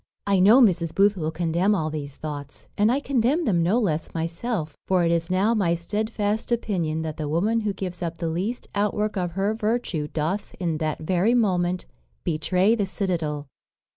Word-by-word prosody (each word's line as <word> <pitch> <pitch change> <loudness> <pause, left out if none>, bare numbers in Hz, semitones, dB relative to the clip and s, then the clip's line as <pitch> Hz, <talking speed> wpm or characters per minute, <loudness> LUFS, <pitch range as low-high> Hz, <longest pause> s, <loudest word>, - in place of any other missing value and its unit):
"I 200 -1 +3
know 215 +8 +7
Mrs. 170 -7 +3
Booth 200 +1 +4
will 160 -4 -2
condemn 170 +5 +1
all 155 -4 -1
these 145 -3 -5
thoughts, 145 -2 -7
and 210 +3 +3
I 265 - +2
condemn 280 +5 +1
them 180 -8 +2
no 180 +7 +2
less 170 -11 -1
myself; 165 0 -3
for 185 -2 +3
it 165 - +2
is 165 0 0
now 195 +5 +2
my 185 -6 +2
stedfast 210 +5 -2
opinion 175 -9 -1
that 155 -1 -5
the 150 -2 -3
woman 205 +9 +1
who 210 -2 -1
gives 185 -2 -6
up 170 -1 -3
the 165 - -2
least 185 +9 -2
outwork 210 +1 0
of 180 -3 -2
her 195 +3 0
virtue 215 -8 -1
doth, 165 +7 -2
in 165 -4 -1
that 155 -1 -2
very 185 +8 +2
moment, 180 -5 +1 0.4
betray 180 +6 +2
the 205 -4 0
citadel. 165 -7 -2
185 Hz, 185 wpm, -24 LUFS, 165-210 Hz, 0.4 s, know